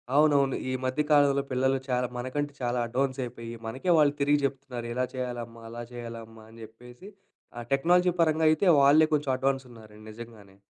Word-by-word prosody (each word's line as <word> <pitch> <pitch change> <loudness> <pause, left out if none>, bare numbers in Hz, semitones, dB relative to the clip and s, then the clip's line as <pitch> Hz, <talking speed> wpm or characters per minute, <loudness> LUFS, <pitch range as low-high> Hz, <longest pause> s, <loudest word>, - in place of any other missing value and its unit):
అవునవును. 145 -3 +3
ఈ - - -2
మధ్య 130 +3 0
కాలంలో 140 -1 +4
పిల్లలు 130 +1 +1
చాలా 125 0 0
మనకంటే 145 +4 -3
చాలా 120 0 -1
అడ్వాన్స్ 130 +2 -2
అయిపోయి, 115 -1 -8
మనకే 130 +10 -2
వాళ్ళు 145 -2 +4
తిరిగి 145 +1 +3
చెప్తున్నారు. 130 -3 -5
ఇలా 125 +1 0
చేయాలమ్మా, 120 -2 -6
అలా 120 +1 -7
చేయాలమ్మా 115 -2 -9
అని 115 - -15
చెప్పేసి 120 - -14 0.5
ఆ - - -5
టెక్నాలజీ 180 +6 +3
పరంగా 160 0 +2
అయితే 155 +5 +1 0.2
వాళ్ళే 145 +3 +6
కొంచెం 145 -2 0
అడ్వాన్స్ 135 0 -1
ఉన్నారండి 110 -2 -15
నిజంగానే. 110 -3 -12
130 Hz, 165 wpm, -27 LUFS, 120-145 Hz, 0.5 s, వాళ్ళే